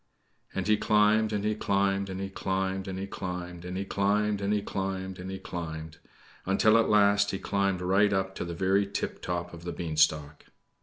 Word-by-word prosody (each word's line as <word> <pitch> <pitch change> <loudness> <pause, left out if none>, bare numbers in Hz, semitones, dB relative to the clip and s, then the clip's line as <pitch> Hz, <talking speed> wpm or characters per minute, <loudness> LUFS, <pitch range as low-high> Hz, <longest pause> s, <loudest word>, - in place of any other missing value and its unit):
And 95 - -1
he 105 0 +4
climbed, 105 +1 +3
and 105 -1 -1
he 110 - +2
climbed, 100 -1 0
and 95 0 -5
he 95 0 -4
climbed, 95 0 -2
and 95 -1 -4
he 95 - -3
climbed, 90 -3 -6
and 90 +1 -5
he 100 - -2
climbed, 100 +1 +1
and 100 +1 0
he 105 -1 +2
climbed, 95 -1 -4
and 90 +1 -6
he 95 - -4
climbed 80 -3 -6 0.5
until 110 +4 +4
at 115 - +2
last 100 -1 +4
he 95 - -2
climbed 100 -1 0
right 95 +3 +3
up 95 -1 0
to - - -2
the 85 -1 -5
very 95 +3 +2
tiptop 90 -3 -4
of 85 0 -10
the 85 - -4
beanstalk. 75 -3 0
95 Hz, 195 wpm, -28 LUFS, 90-100 Hz, 0.5 s, he